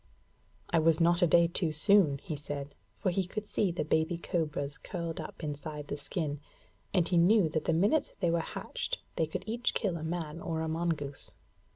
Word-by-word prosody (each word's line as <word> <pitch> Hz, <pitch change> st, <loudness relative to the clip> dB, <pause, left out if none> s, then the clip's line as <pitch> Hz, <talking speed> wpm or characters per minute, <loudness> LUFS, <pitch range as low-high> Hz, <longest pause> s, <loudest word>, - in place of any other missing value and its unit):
'I 165 Hz, -, +4 dB
was 160 Hz, 0 st, +4 dB
not 170 Hz, +2 st, +4 dB
a 175 Hz, -, +6 dB
day 170 Hz, +2 st, +6 dB
too 170 Hz, -1 st, -1 dB
soon,' 155 Hz, -2 st, +4 dB
he 155 Hz, -, -4 dB
said; 145 Hz, -1 st, -6 dB, 0.2 s
for 185 Hz, -, 0 dB
he 190 Hz, +2 st, +1 dB
could 210 Hz, +2 st, -5 dB
see 200 Hz, -3 st, +1 dB
the 170 Hz, -, -2 dB
baby 160 Hz, +2 st, +1 dB
cobras 150 Hz, -4 st, -2 dB
curled 170 Hz, -3 st, -4 dB
up -, -, -9 dB
inside 150 Hz, 0 st, -5 dB
the -, -, -1 dB
skin, 145 Hz, -1 st, -3 dB, 0.5 s
and 180 Hz, -4 st, +2 dB
he 175 Hz, -, +2 dB
knew 190 Hz, +1 st, +5 dB
that 155 Hz, 0 st, -2 dB
the -, -, +2 dB
minute 205 Hz, -, +2 dB
they 175 Hz, -4 st, +2 dB
were 170 Hz, -, +2 dB
hatched -, -, -3 dB, 0.2 s
they 160 Hz, -, +1 dB
could 180 Hz, +4 st, -4 dB
each 235 Hz, +3 st, 0 dB
kill 190 Hz, -7 st, 0 dB
a 155 Hz, -, -6 dB
man 165 Hz, -1 st, -3 dB
or 160 Hz, -2 st, -2 dB
a 160 Hz, -, -1 dB
mongoose. 160 Hz, -4 st, -2 dB
165 Hz, 200 wpm, -31 LUFS, 155-175 Hz, 0.5 s, a